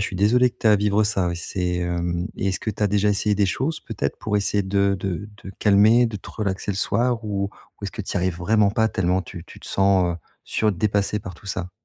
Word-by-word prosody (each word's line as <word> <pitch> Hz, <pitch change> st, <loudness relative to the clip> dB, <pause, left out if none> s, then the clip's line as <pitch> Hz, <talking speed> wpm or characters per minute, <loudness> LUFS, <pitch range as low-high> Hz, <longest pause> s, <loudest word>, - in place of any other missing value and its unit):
suis 95 Hz, -, -4 dB
désolé 120 Hz, +6 st, +4 dB
que -, -, -33 dB
tu -, -, -2 dB
es -, -, +7 dB
à 105 Hz, -, +6 dB
vivre 105 Hz, +1 st, +2 dB
ça, 100 Hz, -4 st, +1 dB
oui 85 Hz, -, -3 dB
c'est, 90 Hz, +1 st, -2 dB
hem 85 Hz, +1 st, -2 dB
et 95 Hz, -, -1 dB
est-ce 95 Hz, -, -1 dB
que 110 Hz, -, -2 dB
tu 105 Hz, -, -5 dB
as -, -, +5 dB
déjà 105 Hz, +1 st, +2 dB
essayé 105 Hz, +1 st, +1 dB
des 100 Hz, 0 st, +2 dB
choses 140 Hz, +11 st, -2 dB
peut-être, 85 Hz, -12 st, -4 dB
pour 105 Hz, -1 st, -1 dB
essayer 100 Hz, 0 st, +1 dB
de 100 Hz, 0 st, +1 dB
de 95 Hz, +2 st, -3 dB
de 95 Hz, -, -8 dB
calmer, 105 Hz, +4 st, +5 dB
de 115 Hz, -2 st, -4 dB
te -, -, -12 dB
relaxer 100 Hz, -2 st, -3 dB
le 95 Hz, -, -3 dB
soir 115 Hz, +3 st, 0 dB
ou 100 Hz, -2 st, -1 dB, 0.4 s
ou -, -, -6 dB
est-ce 100 Hz, -, -3 dB
que 105 Hz, -, -5 dB
tu -, -, -5 dB
y -, -, 0 dB
arrives 90 Hz, -1 st, -1 dB
vraiment 105 Hz, +3 st, +2 dB
pas, 110 Hz, +2 st, +2 dB
tellement 95 Hz, -2 st, 0 dB
tu 85 Hz, -2 st, -10 dB
tu -, -, -14 dB
te -, -, -12 dB
sens, 95 Hz, -3 st, +2 dB
heu, -, -, -5 dB, 0.3 s
sur 110 Hz, -1 st, +1 dB
dépasser 100 Hz, +2 st, 0 dB
par 95 Hz, -, -7 dB
tout 95 Hz, -, -17 dB
ça? 95 Hz, -2 st, -4 dB
100 Hz, 265 wpm, -23 LUFS, 95-105 Hz, 0.4 s, es